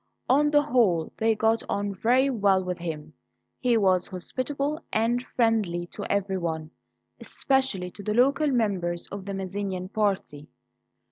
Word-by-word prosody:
On 295 +3 +4
the 295 0 +4
whole 220 - +2
they 225 0 +2
got 225 +1 +2
on 200 0 -1
very 250 +7 +2
well 200 -5 +2
with 180 -1 -4
him. 155 -2 -6 0.5
He 240 -2 +2
was 185 -3 +2
hospitable 275 - -3
and 230 +3 +1
friendly 220 -9 0
to 205 - -5
everyone, 170 -6 -2 0.5
especially 265 -10 0
to 205 - -11
the 210 +1 -2
local 280 +5 +3
members 190 -9 0
of 195 -1 -6
the 200 -1 -4
Mazzinian 190 -1 -4
party. 195 -9 -1
205 Hz, 140 wpm, -26 LUFS, 180-245 Hz, 0.5 s, On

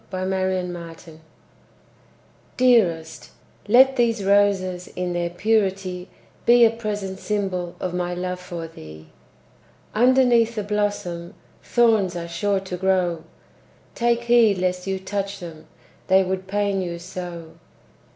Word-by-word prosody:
Y 185 - -4
Z 185 - -2
Valentine 180 -3 -2
Song 160 -2 -15 1.4
Dearest, 185 -11 +2 0.4
let 265 +5 +6
these 230 -3 +1
roses 195 -3 +2
In 180 -1 -2
their 175 0 -1
purity, 190 -1 -1 0.4
Be 240 0 +7
a 225 - +4
present 205 -4 -5
symbol 190 -4 -3
Of 180 -1 -3
my 180 0 -2
love 180 0 -4
for 175 -2 -7
thee. 80 - -13 0.8
Underneath 240 -1 +4
the 210 - -2
blossom 205 -5 -3 0.3
Thorns 220 -7 +2
are 170 -1 -5
sure 195 +3 -1
to 185 -2 -6
grow; 180 -3 0 0.7
Take 235 0 +1
heed 235 -4 +4
lest 180 0 -2
you 190 0 -1
touch 200 +1 -4
them, 165 -4 -10 0.4
They 190 0 +5
would 190 0 -3
pain 200 0 0
you 175 -2 -4
so! 170 -2 -8
190 Hz, 130 wpm, -23 LUFS, 175-210 Hz, 1.4 s, Be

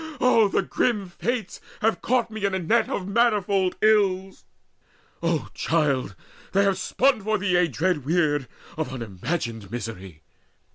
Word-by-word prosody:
Oh, 230 -4 +5
the - - 0
grim 210 -7 0
fates 235 +6 -3 0.2
have 215 -4 +1
caught 245 -2 +1
me 220 -1 -6
in 200 -1 +1
a - - +1
net 220 +6 +1
Of 185 - -3
manifold 200 -4 +2
ills! 195 -3 +2 0.8
O 165 -2 -1
child, 140 -10 0 0.4
they 200 +1 +4
have 195 -1 +1
spun 255 +4 +2
for 215 +2 0
thee 180 -3 +2
Dread 160 +1 -1
weird 145 -3 +1 0.3
of 160 -3 -2
unimagined 115 - -4
misery! 95 -8 -7
185 Hz, 140 wpm, -24 LUFS, 145-210 Hz, 0.8 s, Oh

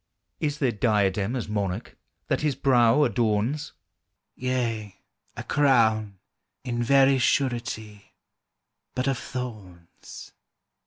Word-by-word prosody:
Is 150 -1 -1
there 135 -5 +1
diadem, 105 0 +1
as 125 - -3
Monarch, 100 -1 -3 0.3
That - - 0
His 150 -3 0
brow 125 +1 +4
adorns? 115 +3 0 0.6
"Yea, 115 -6 -3 0.4
a - - -5
crown, 110 -8 +2 0.5
in 120 -1 -2
very 135 +2 +4
surety, 115 -6 -2 0.8
But 125 +1 -1
of 135 -2 0
thorns." 105 -10 -9
120 Hz, 100 wpm, -25 LUFS, 105-130 Hz, 0.8 s, brow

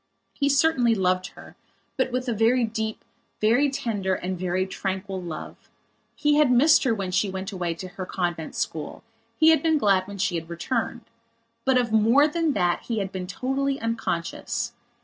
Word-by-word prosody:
He 280 -1 0
certainly 280 -5 +3
loved 185 -2 +1
her, - - -13 0.4
but 260 -1 0
with 255 +1 -2
a 240 - +1
very 230 +3 +3
deep, 220 -1 -3 0.3
very 240 +7 +3
tender 205 -8 -1
and 185 +1 -3
very 185 +1 -1
tranquil 190 0 -4
love. 165 -3 -8 0.5
He 295 0 +2
had 300 -3 +5
missed 285 +5 +5
her 235 -3 +2
when 195 -3 -3
she 195 +2 +1
went 190 +2 -5
away 175 -3 -2
to 185 +3 -7
her 185 0 -7
convent 175 -3 -3
school; 155 -2 -4 0.3
he 315 - +6
had 320 - +4
been 320 -2 +3
glad 195 -7 +2
when 200 0 -8
she 195 -1 0
had 165 -1 -4
returned. 230 +7 -2 0.6
But 265 -1 +4
of 240 -3 +1
more 230 +7 +5
than 325 -1 0
that 175 -5 +1
he 230 - -3
had 195 -2 -2
been 185 -1 -5
totally 270 +7 -1
unconscious. 230 +1 -3
220 Hz, 180 wpm, -25 LUFS, 185-255 Hz, 0.6 s, he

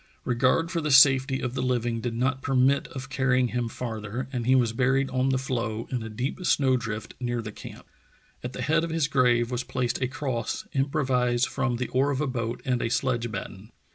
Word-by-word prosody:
Regard 130 +7 +2
for 170 -2 -1
the 150 - -2
safety 130 -1 +6
of 125 -1 -3
the 130 - -2
living 120 -2 0
did 120 -1 -3
not 130 +2 0
permit 135 +1 +2
of 135 0 -7
carrying 130 -2 +2
him 120 -1 -2
far 115 -2 -5
ther, 115 +5 -5
and 120 -2 -2
he 130 - +5
was 120 -3 +2
buried 135 +3 +1
on 130 +1 +1
the 130 - +2
floe, 115 -4 -3
in 125 -2 -1
a 110 - -6
deep 125 - -4
snow 135 -6 +3
drift 110 -3 -4
near 120 -1 -2
the 110 -2 -5
camp. - - -11 0.6
At 125 +1 -5
the - - -4
head 160 +2 +2
of 165 - -2
his 160 -3 +1
grave 125 -4 +2
was 125 0 -1
placed 125 -1 -2
a 130 - +1
cross 130 -4 -3
improvised 130 -3 +1
from 130 -2 -1
the 125 +1 -3
oar 135 +3 +2
of 140 -2 -1
a 150 - +1
boat 120 -2 -3
and 125 -3 0
a 115 - -1
sledge 120 -2 0
batten. 105 0 -7
125 Hz, 220 wpm, -26 LUFS, 120-135 Hz, 0.6 s, safety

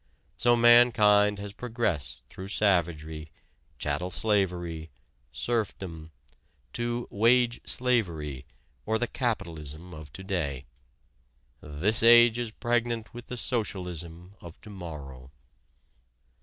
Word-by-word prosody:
So 120 0 +3
mankind 115 -4 +5
has 100 0 -7
progressed 105 - -3
through 95 +9 -9
savagery, 80 -6 0 0.5
chattel 75 +5 -2
slavery, 90 -5 -1 0.4
serfdom, 95 -9 -3 0.6
to 120 0 -3
"wage 120 +3 +3
slavery" 85 - 0 0.4
or 110 +1 0
the 120 - 0
capitalism 85 - -4
of 75 -3 -11
to 95 - -8
day. 75 -9 -3 1.0
This 80 +9 +2
age 120 0 +7
is 120 -2 -2
pregnant 120 0 -2
with 120 0 -10
the 125 - -6
socialism 90 - -4
of 85 -1 -12
to 105 - -12
morrow. 70 -9 -9
100 Hz, 100 wpm, -27 LUFS, 80-115 Hz, 1.0 s, age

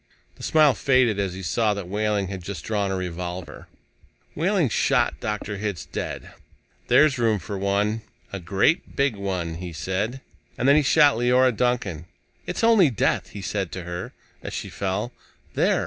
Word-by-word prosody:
The - - -16
smile 155 -3 +4
faded 125 -7 +2
as 95 -2 -1
he 95 - -7
saw 105 +4 +1
that 100 -3 -6
Wehling 105 0 0
had 95 -2 -5
just 90 -4 -6
drawn 105 -3 0
a 95 - -1
revolver. 90 -1 -5 0.7
Wehling 180 0 +2
shot - - +1
Dr. 105 -1 -3
Hitz 100 -5 -4
dead. - - -5 0.6
"There's 150 -5 +4
room 115 -3 +2
for 100 +1 -6
one 100 +3 0 0.3
a 100 - -3
great 95 - +1
big 140 -4 +1
one," 90 -5 -3
he 90 -1 -5
said. 95 - -3 0.4
And 125 - 0
then 140 - +7
he 155 - +5
shot 145 -1 +5
Leora 125 +1 +3
Duncan. 105 -9 -1 0.4
"It's - - -3
only 225 -8 +6
death," 115 - 0
he 100 -1 -8
said 95 -2 -2
to 95 - -5
her 85 +1 -5 0.3
as - - -7
she - - -5
fell. 100 +5 -2 0.4
"There! - - +2
105 Hz, 170 wpm, -24 LUFS, 95-125 Hz, 0.7 s, then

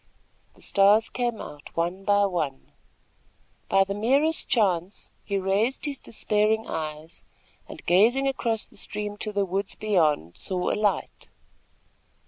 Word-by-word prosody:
The - - -13
stars 205 +3 +4
came 240 -3 -2
out 145 +2 -10
one 175 +3 -1
by 205 0 +3
one. 160 -8 -3 1.0
By 195 - +5
the 200 +1 -4
merest 275 +10 +1
chance, 190 -4 0
he 200 -2 -2
raised 205 +8 0
his 285 -2 -3
despairing 215 0 0
eyes 155 0 -6 0.5
and, - - -10
gazing 230 +10 +4
across 230 -5 -1
the - - -17
stream 210 0 -3
to 215 - -3
the 200 -1 0
woods 195 +2 -3
beyond, 155 - +1
saw 180 - -1
a - - +1
light. 205 -5 -1
200 Hz, 135 wpm, -26 LUFS, 180-220 Hz, 1.0 s, By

